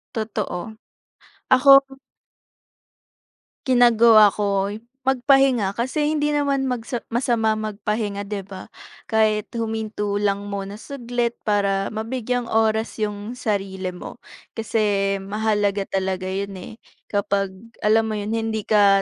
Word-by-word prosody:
Totoo, 215 Hz, -3 st, -3 dB, 0.8 s
ako 270 Hz, +1 st, +6 dB, 1.7 s
ginagawa 235 Hz, -4 st, +6 dB
ko 200 Hz, -1 st, -1 dB, 0.4 s
magpahinga. 265 Hz, -5 st, +3 dB
Kasi 260 Hz, +7 st, -1 dB
hindi 295 Hz, -1 st, 0 dB
naman 280 Hz, -2 st, +1 dB
magsa 240 Hz, -1 st, -3 dB
masama 230 Hz, -2 st, +1 dB
magpahinga, 210 Hz, -1 st, -3 dB
'di 200 Hz, -1 st, -5 dB
ba? 190 Hz, -1 st, -10 dB, 0.4 s
Kahit 215 Hz, -1 st, +2 dB
huminto 220 Hz, -2 st, -2 dB
lang 200 Hz, 0 st, 0 dB
muna 200 Hz, 0 st, -5 dB
saglit 240 Hz, -1 st, -3 dB
para 200 Hz, -2 st, 0 dB
mabigyang 245 Hz, +2 st, -3 dB
oras 220 Hz, 0 st, 0 dB
'yong 210 Hz, +2 st, -3 dB
sarili 195 Hz, -5 st, -3 dB
mo. 180 Hz, -1 st, -10 dB, 0.3 s
Kasi 205 Hz, -3 st, 0 dB
mahalaga 205 Hz, 0 st, 0 dB
talaga 190 Hz, -1 st, -2 dB
'yon, 195 Hz, +1 st, -3 dB
eh, -, -, -9 dB, 0.4 s
kapag, 200 Hz, -1 st, -1 dB, 0.3 s
alam 220 Hz, +1 st, +3 dB
mo 220 Hz, -, -3 dB
'yon, 210 Hz, +1 st, -3 dB
hindi 225 Hz, -1 st, -2 dB
ka 200 Hz, -2 st, +4 dB
215 Hz, 110 wpm, -22 LUFS, 200-235 Hz, 1.7 s, ako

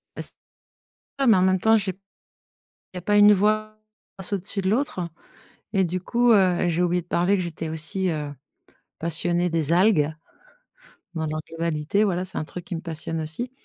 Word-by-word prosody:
Est-ce -, -, -6 dB, 0.9 s
non, 275 Hz, -, +3 dB
mais 220 Hz, -, +7 dB
en 185 Hz, -, +3 dB
même 185 Hz, -1 st, +3 dB
temps, 220 Hz, +2 st, +5 dB
j'ai 195 Hz, -3 st, -1 dB, 1.0 s
il -, -, -6 dB
y -, -, -11 dB
pas 205 Hz, +3 st, +2 dB
une 205 Hz, 0 st, +8 dB
voix 215 Hz, +2 st, +1 dB, 0.4 s
passe 190 Hz, -, -1 dB
au-dessus 200 Hz, +1 st, -1 dB
de 190 Hz, -, 0 dB
l'autre. 230 Hz, -3 st, 0 dB, 0.7 s
Et 190 Hz, -1 st, +3 dB
du 180 Hz, +1 st, -2 dB
coup, 240 Hz, +6 st, +2 dB
heu, 185 Hz, -4 st, +3 dB
j'ai 170 Hz, +1 st, +1 dB
oublié 180 Hz, 0 st, +1 dB
de -, -, -29 dB
parler 180 Hz, +3 st, +2 dB
que 185 Hz, -, -1 dB
j'étais 165 Hz, -1 st, -5 dB
aussi, 160 Hz, +4 st, -2 dB
heu, 150 Hz, -2 st, -3 dB, 0.7 s
passionnée 170 Hz, +2 st, 0 dB
des 165 Hz, -2 st, 0 dB
algues, 175 Hz, -4 st, +4 dB, 1.0 s
dans 160 Hz, -1 st, -2 dB
leur 155 Hz, 0 st, -3 dB
globalité. 165 Hz, +3 st, -1 dB
Voilà, 185 Hz, -3 st, 0 dB
c'est 185 Hz, -, -5 dB
un -, -, -2 dB
truc 175 Hz, +3 st, -7 dB
qui -, -, -6 dB
me 165 Hz, -, -3 dB
passionne 165 Hz, -1 st, -5 dB
aussi, 160 Hz, +11 st, -4 dB
180 Hz, 185 wpm, -24 LUFS, 165-200 Hz, 1.0 s, une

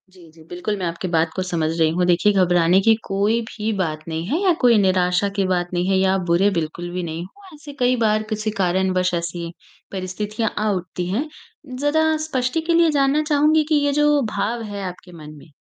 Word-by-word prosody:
जी, 180 Hz, -3 st, -17 dB
जी, 160 Hz, 0 st, -18 dB
बिल्कुल 180 Hz, +4 st, -3 dB
मैं 185 Hz, -, -3 dB
आपकी 170 Hz, +2 st, -4 dB
बात 165 Hz, -1 st, +1 dB
को 185 Hz, -, -1 dB
समझ 170 Hz, -4 st, -1 dB
रही 160 Hz, -1 st, +4 dB
हूँ। 180 Hz, 0 st, +1 dB
देखिए, 180 Hz, +3 st, +3 dB
घबराने 180 Hz, -1 st, +3 dB
की 225 Hz, +3 st, +5 dB
कोई 200 Hz, +4 st, +1 dB
भी 215 Hz, +1 st, -3 dB
बात 160 Hz, -5 st, -2 dB
नहीं 165 Hz, 0 st, -4 dB
है 300 Hz, -, 0 dB
या 375 Hz, -3 st, +3 dB
कोई 240 Hz, -2 st, +5 dB
निराशा 185 Hz, -1 st, +2 dB
की 200 Hz, -2 st, +1 dB
बात 180 Hz, -1 st, 0 dB
नहीं 175 Hz, +1 st, 0 dB
है 190 Hz, -, +3 dB
या 190 Hz, 0 st, +2 dB
आप 195 Hz, -, 0 dB
बुरे 175 Hz, +4 st, +3 dB
बिल्कुल 170 Hz, 0 st, -3 dB
भी 180 Hz, 0 st, -3 dB
नहीं 165 Hz, 0 st, -5 dB
हो, 380 Hz, -, -16 dB
ऐसे 295 Hz, -1 st, -11 dB
कई 250 Hz, 0 st, +3 dB
बार 215 Hz, 0 st, +2 dB
कुछ 215 Hz, 0 st, -3 dB
कारणवश 185 Hz, 0 st, +1 dB
ऐसी 170 Hz, 0 st, -3 dB, 0.4 s
परिस्थितियाँ 205 Hz, +4 st, -3 dB
आ 215 Hz, +1 st, 0 dB
उठती 180 Hz, -1 st, -4 dB
हैं। 245 Hz, +11 st, -1 dB, 0.5 s
ज़रा 315 Hz, +2 st, +2 dB
स्पष्टि 260 Hz, +2 st, -1 dB
के 335 Hz, +1 st, 0 dB
लिए 335 Hz, 0 st, +4 dB
जानना 280 Hz, +1 st, +2 dB
चाहूँगी 305 Hz, +1 st, +3 dB
कि 310 Hz, -, +3 dB
ये 285 Hz, -, +2 dB
जो 295 Hz, -1 st, +3 dB
भाव 225 Hz, +4 st, -1 dB
है 200 Hz, -1 st, -5 dB
आपके 180 Hz, -1 st, -8 dB
मन 155 Hz, -3 st, -11 dB
में। 145 Hz, -, -15 dB
190 Hz, 215 wpm, -21 LUFS, 175-240 Hz, 0.5 s, की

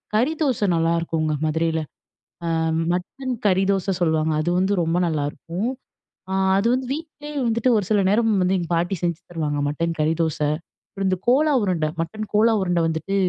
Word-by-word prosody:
கறி 255 Hz, +9 st, +2 dB
தோச 255 Hz, -8 st, +1 dB
நல்லாருக்குங்க 165 Hz, -1 st, 0 dB
மதுரையில. 160 Hz, +1 st, 0 dB, 0.7 s
அ -, -, +1 dB, 0.4 s
மட்டன் 250 Hz, +9 st, -3 dB
கறி 190 Hz, 0 st, +3 dB
தோச 195 Hz, 0 st, 0 dB
சொல்லுவாங்க. 160 Hz, -2 st, +2 dB
அது 175 Hz, -, 0 dB
வந்து 190 Hz, +2 st, +2 dB
ரொம்ப 165 Hz, +2 st, 0 dB
நல்லாருக்கும். 165 Hz, +7 st, -2 dB, 0.6 s
அ -, -, -1 dB, 0.2 s
அது 200 Hz, +4 st, +2 dB
வந்து 255 Hz, 0 st, -1 dB
வீட்டிலேயே 300 Hz, -1 st, -8 dB
வந்துட்டு 230 Hz, +2 st, +1 dB
ஒரு 205 Hz, -, 0 dB
சில 205 Hz, -2 st, +4 dB
நேரம் 225 Hz, +1 st, +3 dB
வந்து 185 Hz, +1 st, +2 dB
எங்க 170 Hz, -, -5 dB
பாட்டி 175 Hz, +3 st, 0 dB
செஞ்சு 170 Hz, -1 st, 0 dB
தருவாங்க. 150 Hz, -3 st, -2 dB
மட்டன் 165 Hz, +3 st, -2 dB
கறி 155 Hz, +1 st, +2 dB
தோச, 160 Hz, -2 st, -2 dB, 0.5 s
அப்புறம் 195 Hz, -1 st, -3 dB
இந்த 185 Hz, -, 0 dB
கோலா 295 Hz, +4 st, +4 dB
உருண்ட. 180 Hz, -5 st, 0 dB, 0.2 s
மட்டன் 215 Hz, +6 st, -4 dB
கோலா 225 Hz, +2 st, +5 dB
உருண்ட 175 Hz, -2 st, +1 dB
வந்துட்டு 160 Hz, +5 st, -2 dB
180 Hz, 165 wpm, -23 LUFS, 165-220 Hz, 0.7 s, கோலா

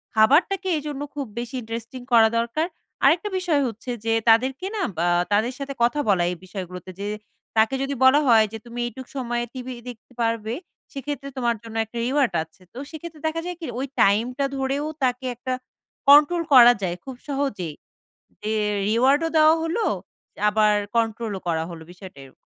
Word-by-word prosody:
খাবারটাকে 320 Hz, -, +4 dB
এজন্য 295 Hz, -2 st, -5 dB
খুব 285 Hz, -2 st, -3 dB
বেশি 240 Hz, +2 st, -5 dB
ইন্টারেস্টিং 230 Hz, +2 st, -7 dB
করা 225 Hz, -1 st, +7 dB
দরকার। 235 Hz, +8 st, -1 dB, 0.4 s
আরেকটা 330 Hz, +9 st, +4 dB
বিষয় 335 Hz, -6 st, +1 dB
হচ্ছে 230 Hz, +2 st, -8 dB, 0.2 s
যে, 225 Hz, -, +2 dB, 0.2 s
তাদেরকে 260 Hz, +8 st, +3 dB
না 420 Hz, -, -2 dB, 0.2 s
বা 170 Hz, -, +1 dB, 0.3 s
তাদের 220 Hz, +5 st, +2 dB
সাথে 275 Hz, 0 st, -4 dB
কথা 245 Hz, +5 st, +2 dB
বলা 185 Hz, -3 st, +3 dB
এই -, -, -4 dB
বিষয়গুলোতে। 185 Hz, -1 st, -7 dB
যে, 200 Hz, -, -3 dB, 0.5 s
তাকে 220 Hz, +4 st, +4 dB
যদি 275 Hz, +1 st, -2 dB
বলা 265 Hz, +3 st, +7 dB
হয় 225 Hz, -3 st, +6 dB
যে, -, -, -4 dB
তুমি 240 Hz, 0 st, -8 dB
এইটুক 245 Hz, +2 st, -9 dB
সময়ে 240 Hz, -2 st, -1 dB
টিভি 255 Hz, -1 st, -6 dB, 0.2 s
দেখতে 245 Hz, +1 st, -12 dB
পারবে, 230 Hz, -1 st, -1 dB, 0.4 s
সেক্ষেত্রে 275 Hz, 0 st, -5 dB
তোমার 240 Hz, -2 st, +1 dB
জন্য 225 Hz, -1 st, -10 dB
একটা 220 Hz, +2 st, -10 dB
reward 260 Hz, -4 st, +1 dB
আছে। 160 Hz, +3 st, -23 dB
তো -, -, -12 dB
সেক্ষেত্রে 315 Hz, -1 st, -9 dB
দেখা 325 Hz, +1 st, -2 dB
যায় 355 Hz, -1 st, -5 dB
কি, -, -, -4 dB
ওই 265 Hz, -, -1 dB, 0.2 s
টাইমটা 240 Hz, +7 st, +2 dB
ধরেও 270 Hz, +2 st, -1 dB, 0.2 s
তাকে 255 Hz, 0 st, 0 dB
একটা 255 Hz, +2 st, -4 dB, 0.6 s
কন্ট্রোল 300 Hz, +4 st, +7 dB
করা 245 Hz, -2 st, +9 dB
যায় 175 Hz, -2 st, -1 dB
খুব 265 Hz, -1 st, -7 dB
সহজেই। 265 Hz, -, -2 dB, 0.7 s
যে, 215 Hz, -, -2 dB, 0.4 s
reward 260 Hz, +7 st, +4 dB
ও -, -, -3 dB
দেওয়া 310 Hz, +1 st, +6 dB
হলো, 350 Hz, +8 st, -1 dB, 0.7 s
আবার 210 Hz, 0 st, +3 dB, 0.2 s
কন্ট্রোলও 225 Hz, -3 st, -1 dB
করা 160 Hz, -1 st, 0 dB
হলো, 165 Hz, -2 st, -9 dB
বিষয়টা 180 Hz, -5 st, -12 dB
এরকম। 130 Hz, -, -18 dB
245 Hz, 170 wpm, -24 LUFS, 220-280 Hz, 0.7 s, করা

